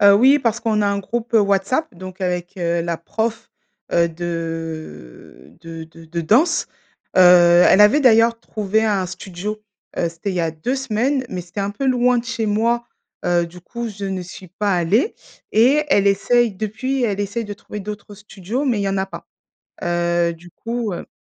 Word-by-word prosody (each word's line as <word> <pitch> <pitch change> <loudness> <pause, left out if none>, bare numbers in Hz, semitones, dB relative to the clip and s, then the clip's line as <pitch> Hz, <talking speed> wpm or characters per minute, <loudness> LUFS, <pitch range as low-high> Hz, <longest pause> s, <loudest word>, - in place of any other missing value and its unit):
Heu, 200 0 +7
oui, 260 +7 +6
parce 235 -3 -1
qu'on 215 -2 +1
a - - +2
un 200 0 0
groupe, 235 +4 -4
heu, 225 - +7
WhatsApp 200 +9 0
donc 185 +2 -10
heu, - - -1
avec, 180 0 -3
heu, 170 -1 0
la 170 0 -2
prof, 220 +7 -4 0.4
heu, 170 0 +3
de 165 - -7
de 165 -1 -8
de 165 +1 -15
de 170 +1 -4
danse. 255 - +2 0.5
Heu, - - +6 0.5
elle 195 - +5
avait 210 +8 +6
d'ailleurs 230 -3 +4
trouvé 215 0 -1
un 200 -4 +1
studio, 190 +3 -6 0.4
heu, 170 - 0
c'était 165 +4 -5
il - - -4
y 180 - 0
a 165 -1 0
2 165 +12 -3
semaines 265 +1 0
mais 185 - -4
c'était 175 +3 -7
un 200 0 -1
peu 270 +7 -4
loin 250 -1 +3
de 235 - -4
chez 230 -1 -3
moi, 230 +3 +1 0.4
heu, 175 -1 +2
du 175 +1 -13
coup, 235 +6 -6
je 205 -1 -7
ne 190 -1 -3
suis 180 +1 -11
pas 200 +3 -1
allée 190 - +1 0.4
et 260 +8 +4
elle 200 -8 +3
essaie 235 +4 +3
depuis, 220 +7 -3
elle 205 -3 -1
essaie 205 +3 -3
de 205 - -6
trouver 210 +1 -8
d'autres 210 +1 -8
studios, 210 +5 -5
mais 245 -6 +1
il - - -1
y 200 - 0
en 195 0 -1
a 190 - -1
pas. - - -10 0.6
Heu, 175 -1 +1
du 170 +1 -14
coup 230 +1 -4
heu - - -7
200 Hz, 200 wpm, -20 LUFS, 175-230 Hz, 0.6 s, Heu